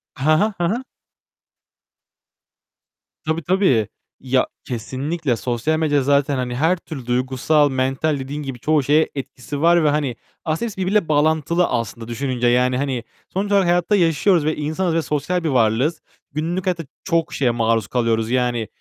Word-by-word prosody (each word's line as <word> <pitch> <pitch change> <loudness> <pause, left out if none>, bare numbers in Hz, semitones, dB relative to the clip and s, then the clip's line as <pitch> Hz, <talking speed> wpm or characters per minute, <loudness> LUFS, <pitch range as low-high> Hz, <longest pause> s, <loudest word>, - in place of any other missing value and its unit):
Ha 155 +4 +3
ha. 215 0 +1
Ha 170 -1 0
ha. 240 +6 -2 2.4
Tabii 160 +1 -2
tabii. 160 - +2 0.3
Ya 130 0 +1 0.2
kesinlikle, 130 +4 -2
sosyal 125 +7 -1
medya 145 -3 +2
zaten 140 +1 +2
hani 125 -1 -2
her 160 +8 +2
türlü 155 -7 -9
duygusal, 130 +4 +2
mental 135 +3 0
dediğin 145 +3 -5
gibi 135 -3 -6
çoğu 150 +3 +2
şeye 150 +4 +3
etkisi 140 +1 -6
var 170 0 +5
ve 150 - +4
hani 145 -4 0 0.3
aslında 160 +8 -1
hepsi 200 - -12
birbiriyle 190 0 +1
bağlantılı 160 +3 +2
aslında 115 -1 -3
düşününce. 125 0 -1
Yani 125 +1 +3
hani 130 -3 -2 0.3
sonuç 200 +2 -2
olarak 200 -2 +4
hayatta 175 +4 +2
yaşıyoruz 165 -1 +3
ve 155 - +1
insanız 160 +4 -1
ve 165 - +2
sosyal 165 +4 -1
bir 160 - 0
varlığız. 125 +5 +1 0.3
Günlük 165 +5 -2
hayatta 175 -3 -1 0.2
çok 165 -3 0
şeye 125 -4 +1
maruz 115 -3 +1
kalıyoruz. 115 -2 0
Yani 120 -3 0
145 Hz, 155 wpm, -21 LUFS, 125-165 Hz, 2.4 s, var